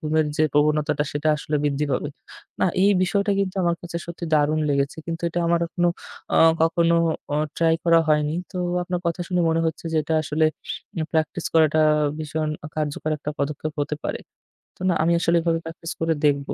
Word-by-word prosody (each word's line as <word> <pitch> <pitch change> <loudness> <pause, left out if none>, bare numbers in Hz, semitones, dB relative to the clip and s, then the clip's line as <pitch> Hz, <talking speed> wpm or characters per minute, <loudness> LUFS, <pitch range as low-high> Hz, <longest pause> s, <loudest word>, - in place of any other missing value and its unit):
ঘুমের 155 0 +1
যে - - +2
প্রবণতাটা 150 0 +2
সেটা 145 +1 -1
আসলে 150 0 -2
বৃদ্ধি 145 0 0
পাবে। 140 +3 -1 0.5
না, - - +4 0.2
এই 200 - +6
বিষয়টা 200 +2 +1
কিন্তু 195 -1 -2
আমার 170 -1 +1
কাছে 170 -1 -6
সত্যি 170 0 -6
দারুণ 150 +1 +2
লেগেছে। 140 0 0
কিন্তু 165 0 -4
এটা 175 - -2
আমার 170 0 +2
এখনো 175 +1 0 0.5
আ - - +3 0.3
কখনো 170 +1 +3 0.4
ও - - +1 0.2
try 165 -1 +3
করা 165 -1 +5
হয়নি। 150 0 +2 0.2
তো 185 - -7 0.3
আপনার 180 0 -3
কথা 170 +1 -1
শুনে 180 -1 +1
মনে 165 0 +1
হচ্ছে 160 +1 -4
যে - - 0
এটা 160 +2 -1
আসলে 155 +1 +1 0.7
practice 160 +1 -1
করাটা 155 -1 +4
আ 150 -1 +2
ভীষণ 155 0 -2 0.3
কার্যকর 155 0 -2
একটা 150 - -4
পদক্ষেপ 150 +2 -2
হতে 145 +1 -2
পারে। - - -3 0.6
তো - - -18
না, 180 - +3
আমি 170 +1 +3
আসলে 170 0 +2
এভাবে 165 0 +1
practice 165 +1 -6
করে 165 0 +2
দেখবো। 140 -1 +1
160 Hz, 190 wpm, -23 LUFS, 150-170 Hz, 0.7 s, এই